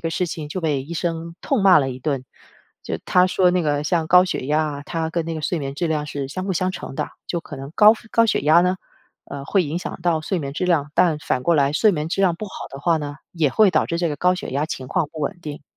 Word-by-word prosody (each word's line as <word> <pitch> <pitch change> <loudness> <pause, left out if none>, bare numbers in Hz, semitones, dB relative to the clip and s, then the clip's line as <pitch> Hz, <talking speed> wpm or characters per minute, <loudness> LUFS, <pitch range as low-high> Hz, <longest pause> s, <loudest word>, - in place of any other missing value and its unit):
个 165 - -2
事 180 +2 -1
情， 160 -2 -6
就 185 +5 -4
被 150 -5 0
医 155 +5 -9
生 165 0 -3
痛 265 -8 0
骂 190 -4 +7
了 135 -2 0
一 125 - -7
顿。 135 -1 -2 0.6
就 - - -3
他 180 0 +4
说 180 0 +3
那 180 -1 +1
个 145 -1 0
像 165 0 0
高 180 +1 +7
血 180 - -3
压 150 +2 +2 0.2
啊， - - -8
它 165 +1 -2
跟 165 -1 -1
那 165 - -4
个 160 - -4
睡 170 +3 -1
眠 135 -2 -4
质 170 +3 -1
量 150 -2 -1
是 140 -2 -4
相 185 +6 -5
辅 195 - 0
相 185 +1 0
成 135 - -7
的， - - -2 0.2
就 170 - -2
可 - - -9
能 135 +1 -8
高 210 +1 +8 0.2
高 230 0 +4
血 - - +1
压 155 +4 +5
呢， 180 +1 +1 0.5
呃， 140 0 -7
会 190 +5 +2
影 160 +3 -3
响 180 - -7
到 165 -2 +1
睡 165 +4 -2
眠 140 -2 -5
质 150 - -2
量， 150 -5 +1
但 170 -4 +3
反 125 -4 -1
过 170 - +3
来 140 -1 +3
睡 210 +6 +4
眠 150 -1 -2
质 190 - -1
量 180 -3 +3
不 215 - -5
好 195 - -12 0.2
的 135 - -9
话 170 +2 +2
呢， 145 -1 -6 0.2
也 160 -5 +1
会 210 +8 +4
导 155 -3 +2
致 170 - -2
这 170 - +1
个 150 - -3
高 180 0 +2
血 185 - -6
压 145 +4 -1
情 130 -5 -6
况 175 -5 0
不 155 - -7
稳 175 +6 -3
定。 150 -3 -7
165 Hz, 305 characters per minute, -22 LUFS, 145-180 Hz, 0.6 s, 高